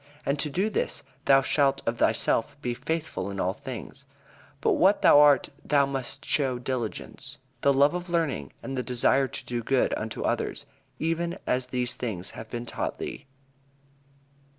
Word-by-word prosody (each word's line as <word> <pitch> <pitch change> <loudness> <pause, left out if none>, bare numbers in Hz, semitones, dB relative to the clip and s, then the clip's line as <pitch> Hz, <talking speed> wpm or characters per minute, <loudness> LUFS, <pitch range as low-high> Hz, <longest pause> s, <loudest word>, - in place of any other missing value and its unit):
And 140 +1 0
to 150 - 0
do 185 +8 0
this, - - -1 0.2
thou 135 0 +6
shalt 140 -1 +2
of 115 +1 -1
thyself 115 +4 +2
be 125 -3 -2
faithful 135 - -3
in 100 -1 -5
all 95 +1 +1
things. 130 +4 -8 0.5
By - - +2
what 195 +3 +4
thou 145 - +8
art 145 -2 +6
thou 140 -2 +3
must 135 -2 -4
show 135 -4 +1
diligence, 130 +2 -4 0.2
the 140 - +4
love 150 +6 +3
for - - -8
learning, 150 - 0
and 135 - -4
the 130 - 0
desire 130 +2 +3
to - - -8
do 120 -1 -2
good 130 +3 +1
unto 110 0 -4
others, - - -1 0.3
even 165 +2 -1
as 125 0 0
these 125 -1 -1
things 95 -6 -4
have 110 - -9
been 120 0 -5
taught - - -3
thee." - - -6
135 Hz, 170 wpm, -27 LUFS, 120-145 Hz, 0.5 s, thou